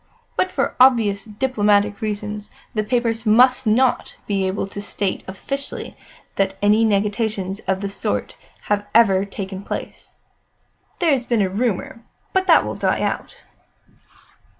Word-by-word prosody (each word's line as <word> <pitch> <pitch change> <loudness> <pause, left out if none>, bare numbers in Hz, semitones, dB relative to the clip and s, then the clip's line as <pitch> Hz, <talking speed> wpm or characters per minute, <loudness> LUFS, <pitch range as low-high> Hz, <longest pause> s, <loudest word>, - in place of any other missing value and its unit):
But 370 - +1
for 275 - -1
obvious 225 -6 +4
diplomatic 210 -3 +1
reasons, 210 -1 -4 0.2
the 215 -2 0
papers 230 -1 0
must 250 +3 +5
not 245 +4 +2
be 195 -2 0
able 190 +2 -2
to 200 +1 -7
state 200 -1 -3
officially 275 +9 -5 0.4
that 195 0 0
any 210 +2 +4
negotiations 205 -2 0
of 190 +1 0
the 200 - -2
sort - - -3 0.3
have 205 0 -1
ever 200 -4 +5
taken 195 -1 -6
place. - - -7 0.8
There 340 -3 +2
has 255 -4 0
been 230 -4 +2
a 190 - 0
rumour, 225 +2 -2 0.3
but 380 -1 +1
that - - +6
will - - -3
die - - 0
out." - - -3
210 Hz, 140 wpm, -21 LUFS, 200-235 Hz, 0.8 s, that